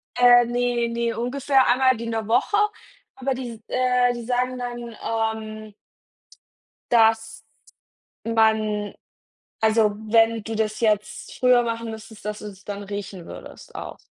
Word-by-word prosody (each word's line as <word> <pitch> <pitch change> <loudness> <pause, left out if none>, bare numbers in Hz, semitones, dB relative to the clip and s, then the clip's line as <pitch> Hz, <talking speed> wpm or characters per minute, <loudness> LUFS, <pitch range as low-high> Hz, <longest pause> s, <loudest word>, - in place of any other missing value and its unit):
Äh, 245 -1 +7
ne, 240 0 0
ne, 235 0 -1
ungefähr 265 +2 +2
einmal 260 +1 +4
die 230 - -6
in 230 - -3
der 220 -1 -3
Woche, 250 - +2 0.6
aber 265 0 -1
die 250 -2 -5
s 225 - -11
äh, 250 -1 +2
die 240 -1 -6
sagen 250 +1 -1
dann 240 -2 -6 0.4
ähm 215 -1 -9 1.2
dass 225 -1 +3 0.8
man 220 -2 +1 0.7
also 220 -1 +4 0.2
wenn 225 0 +4
du 225 +1 -5
das 215 0 -1
jetzt 210 -2 -1
früher 250 -1 +5
machen 230 -1 -3
müsstest, 220 -1 -11
dass 210 0 -4
du 210 - -9
es 200 -1 -11
dann 205 0 -6
riechen 195 -3 -7
würdest - - -11
auch. - - -7
230 Hz, 145 wpm, -23 LUFS, 215-245 Hz, 1.2 s, Äh